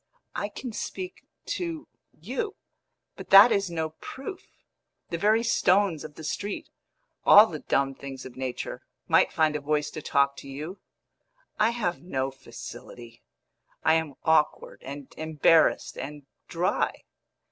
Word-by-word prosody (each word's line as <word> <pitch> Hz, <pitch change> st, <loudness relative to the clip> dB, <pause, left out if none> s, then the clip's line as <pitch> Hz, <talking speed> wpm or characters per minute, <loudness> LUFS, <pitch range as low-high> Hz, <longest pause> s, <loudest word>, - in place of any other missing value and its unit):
"I 205 Hz, -, -2 dB
can 240 Hz, +2 st, -7 dB
speak 365 Hz, -, -6 dB, 0.2 s
to 335 Hz, -3 st, -4 dB, 0.3 s
you; 435 Hz, -4 st, -4 dB, 0.6 s
but -, -, -10 dB
that 200 Hz, +5 st, +10 dB
is 200 Hz, -3 st, +1 dB
no 160 Hz, -2 st, -2 dB
proof. 275 Hz, +8 st, -8 dB, 0.6 s
The 170 Hz, -, -2 dB
very 215 Hz, +4 st, +3 dB
stones 190 Hz, -7 st, +2 dB
of 155 Hz, -1 st, -9 dB
the 160 Hz, -, -10 dB
street 200 Hz, +6 st, -4 dB, 0.5 s
all 205 Hz, +2 st, +9 dB
the 160 Hz, -8 st, -6 dB
dumb 135 Hz, -1 st, 0 dB
things 135 Hz, -1 st, -9 dB
of 130 Hz, -, -10 dB
nature 130 Hz, -1 st, -4 dB, 0.3 s
might -, -, +4 dB
find 155 Hz, -1 st, +2 dB
a 150 Hz, -, -2 dB
voice 150 Hz, +1 st, 0 dB
to 155 Hz, -, -6 dB
talk 140 Hz, -1 st, +2 dB
to 140 Hz, -, -10 dB
you. 155 Hz, +8 st, -7 dB, 0.8 s
I 215 Hz, +1 st, +5 dB
have 215 Hz, -7 st, -2 dB
no 135 Hz, -6 st, -2 dB
facility; 120 Hz, -2 st, -11 dB, 0.6 s
I 160 Hz, -, +5 dB
am 160 Hz, -4 st, 0 dB
awkward 160 Hz, -1 st, +1 dB
and 140 Hz, 0 st, -8 dB
embarrassed 160 Hz, +1 st, +3 dB
and 145 Hz, 0 st, -7 dB, 0.2 s
dry." -, -, -1 dB
160 Hz, 140 wpm, -27 LUFS, 140-205 Hz, 0.8 s, that